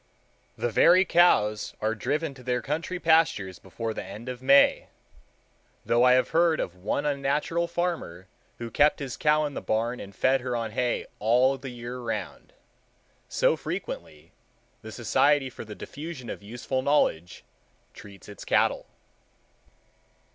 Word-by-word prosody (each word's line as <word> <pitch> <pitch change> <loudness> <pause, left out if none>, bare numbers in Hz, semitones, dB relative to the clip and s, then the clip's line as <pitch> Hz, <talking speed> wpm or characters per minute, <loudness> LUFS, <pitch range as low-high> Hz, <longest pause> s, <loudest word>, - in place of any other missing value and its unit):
The 120 - -1
very 180 - +5
cows 110 - +3
are 110 +1 0
driven 150 +7 -2
to 130 - -14
their 125 0 -2
country 165 +5 -3
pastures 160 - +2
before 110 +4 -5
the - - -5
end 105 +6 -9
of 125 -1 -7
May; 140 +2 +5 1.0
though 120 +1 +3
I 125 0 +6
have 130 0 +2
heard 165 -1 +3
of 90 - -3
one 95 +10 -2
unnatural 145 +4 0
farmer 170 - -3 0.3
who 120 -1 -7
kept 150 +6 +3
his 135 -3 -5
cow 150 0 +2
in 145 - -4
the - - -5
barn 115 +3 -1
and 100 -1 -10
fed 130 0 +2
her 125 -1 -3
on 115 -2 -3
hay 125 +2 -1
all 125 +5 +3
the 135 0 -8
year 120 +1 -7
round. 120 - -5 0.8
So, - - +2
frequently, - - -7 0.5
the - - -9
Society 145 -2 +2
for - - -9
the 105 -1 -9
Diffusion 145 -4 -8
of - - -8
Useful 120 +5 -4
Knowledge 90 - 0 0.5
treats 100 -1 -13
its 100 -1 -10
cattle. - - +1
130 Hz, 150 wpm, -26 LUFS, 115-150 Hz, 1.0 s, I